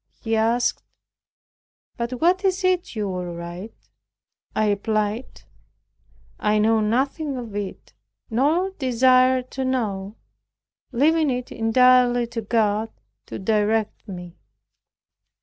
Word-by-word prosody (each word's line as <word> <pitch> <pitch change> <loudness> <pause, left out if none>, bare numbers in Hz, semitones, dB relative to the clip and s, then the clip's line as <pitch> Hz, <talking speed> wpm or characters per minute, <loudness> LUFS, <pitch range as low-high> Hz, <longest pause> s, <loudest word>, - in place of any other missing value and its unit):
He 225 -2 -1
asked, 230 +2 +1 1.1
"But 235 +1 -3
what 365 +4 +2
is 380 0 +1
it 365 -7 0
you 210 -2 -2
will 180 -2 -4
write?" 175 +5 -9 0.6
I 215 0 +2
replied, 215 +3 -2 1.0
"I 210 0 +2
know 220 +1 +3
nothing 270 +6 0
of 230 -4 -7
it, 205 -2 -6 0.3
nor 305 +11 +1
desire 255 -3 +3
to 265 +1 -5
know, 210 -6 -2 0.8
leaving 305 +4 +3
it 250 -1 -3
entirely 245 +1 +4
to 230 - -2
God 215 0 +1 0.4
to - - -6
direct 215 +2 0
me." 180 -3 -9
230 Hz, 110 wpm, -23 LUFS, 210-260 Hz, 1.1 s, entirely